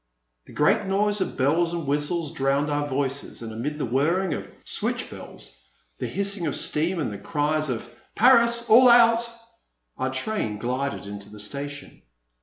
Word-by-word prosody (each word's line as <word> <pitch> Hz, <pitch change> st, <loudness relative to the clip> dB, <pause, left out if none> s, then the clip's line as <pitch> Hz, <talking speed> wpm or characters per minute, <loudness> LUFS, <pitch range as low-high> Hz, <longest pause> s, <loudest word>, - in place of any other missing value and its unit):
A -, -, -13 dB
great 200 Hz, +7 st, +2 dB
noise 205 Hz, +1 st, +1 dB
of -, -, -3 dB
bells 165 Hz, +6 st, +2 dB
and 170 Hz, -2 st, -3 dB
whistles 150 Hz, +3 st, -1 dB
drowned 140 Hz, -1 st, 0 dB
our 145 Hz, 0 st, -1 dB
voices, 135 Hz, -2 st, -3 dB
and 110 Hz, -1 st, -6 dB
amid 140 Hz, +7 st, -4 dB
the 150 Hz, -, -2 dB
whirring 160 Hz, +9 st, +1 dB
of -, -, -6 dB, 0.2 s
switch -, -, -1 dB
bells, -, -, -10 dB, 0.4 s
the -, -, -2 dB
hissing 200 Hz, -3 st, -2 dB
of 145 Hz, -, -1 dB
steam, 165 Hz, +5 st, 0 dB
and 145 Hz, -, -2 dB
the 100 Hz, -, -7 dB
cries 155 Hz, -1 st, -1 dB
of 120 Hz, -1 st, -3 dB, 0.3 s
Paris! 235 Hz, 0 st, +4 dB
All 250 Hz, +3 st, +8 dB
out! 235 Hz, 0 st, +5 dB, 0.3 s
" -, -, -49 dB
our -, -, -1 dB
train 205 Hz, -, -2 dB
glided 125 Hz, +3 st, -3 dB
into 100 Hz, 0 st, -8 dB
the 105 Hz, -, -12 dB
station. 140 Hz, +7 st, -6 dB
150 Hz, 170 wpm, -25 LUFS, 135-195 Hz, 0.4 s, All